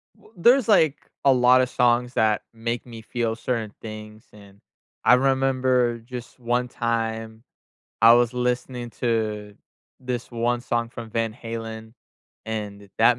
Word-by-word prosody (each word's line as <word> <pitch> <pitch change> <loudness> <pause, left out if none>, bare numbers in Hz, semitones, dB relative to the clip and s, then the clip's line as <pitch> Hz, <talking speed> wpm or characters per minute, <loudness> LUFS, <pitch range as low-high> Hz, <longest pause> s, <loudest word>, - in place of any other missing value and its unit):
W - - -22
There's, 245 +7 +5
like, 160 -9 +3 0.2
a 135 - +7
lot 125 0 +5
of 125 - 0
songs 125 0 +2
that 110 -2 +2
make 115 +1 -3
me 115 -2 -10
feel 115 0 -2
certain 115 -3 -3
things, 110 0 -9
and 100 -1 -16 0.5
I - - +7
remember 130 -2 +2
just 120 +1 -9
one 125 +1 0
time, 115 -2 -3 0.6
I 115 +1 +9
was 120 0 +3
listening 125 0 -2
to 105 -3 -1 0.5
this 125 -2 -4
one 120 0 0
song 120 -1 -1
from 115 -1 -9
Van 115 -1 -1
Halen, 115 -1 -7 0.5
and 105 -2 -5
that 120 +2 +5
120 Hz, 140 wpm, -24 LUFS, 110-125 Hz, 0.6 s, I